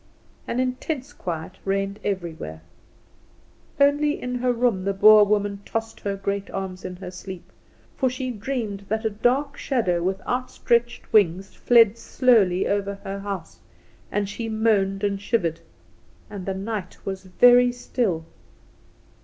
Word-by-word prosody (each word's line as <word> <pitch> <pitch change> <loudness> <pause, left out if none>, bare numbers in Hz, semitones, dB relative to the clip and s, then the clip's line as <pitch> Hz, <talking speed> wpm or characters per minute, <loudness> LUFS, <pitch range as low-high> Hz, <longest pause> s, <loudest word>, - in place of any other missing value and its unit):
An 245 - -2
intense 255 +2 -2
quiet 170 +1 -6
reigned 195 +1 -1
everywhere. 165 - -4 1.2
Only 290 +1 +3
in 250 0 -4
her 250 0 +2
room 235 -6 +1
the 200 0 -1
Boer 215 +2 +8
woman 205 -1 0
tossed 225 +1 -4
her 200 -1 -2
great 200 0 -3
arms 190 -1 -5
in 185 0 -5
her 180 0 -8
sleep; 185 0 -9 0.5
for 260 - +2
she 255 0 -4
dreamed 210 -3 -4
that 220 +2 -1
a 220 - +1
dark 265 +7 0
shadow 185 -10 0
with 190 +2 -1
outstretched 240 -1 -1
wings 195 -2 +3
fled 230 -2 +4
slowly 205 -8 +3
over 200 0 -1
her 195 +1 -5
house, 195 -4 -6 0.5
and 205 -1 0
she 225 +3 -5
moaned 210 -3 +1
and 200 -1 0
shivered. 175 -7 0 0.7
And 200 -3 -7
the 190 - -1
night 195 -1 -5
was 190 -1 -5
very 245 +6 +6
still. 220 -9 -2
205 Hz, 140 wpm, -24 LUFS, 190-240 Hz, 1.2 s, Boer